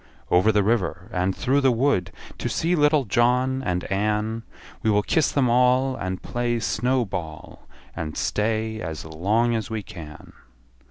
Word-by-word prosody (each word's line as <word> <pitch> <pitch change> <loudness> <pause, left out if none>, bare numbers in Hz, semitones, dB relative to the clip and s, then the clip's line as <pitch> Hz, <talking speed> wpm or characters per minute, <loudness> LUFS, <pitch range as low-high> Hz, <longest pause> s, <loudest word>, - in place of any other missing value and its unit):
Over 90 +5 +5
the 105 -1 +2
river, 95 -5 0
and 90 +1 0
through 140 +3 +2
the 135 -2 +4
wood, 115 -8 +1 0.3
To - - -2
see 170 +2 0
little 150 -3 +3
John 125 +4 +2
and 90 -7 -2
Ann; 105 +3 0 0.4
We 110 - +1
will 105 -1 +3
kiss 160 - +2
them 135 -3 +2
all, 125 +2 +3
And 95 -5 -4
play 120 -1 -1
snow 125 +2 0
ball, 80 -6 -7 0.3
And 75 -2 -5
stay 110 +1 -1
as 80 -1 -5
long 105 +10 +1
as 115 0 -2
we 110 -2 -3
can. 80 -8 -11
110 Hz, 160 wpm, -24 LUFS, 95-125 Hz, 0.4 s, Over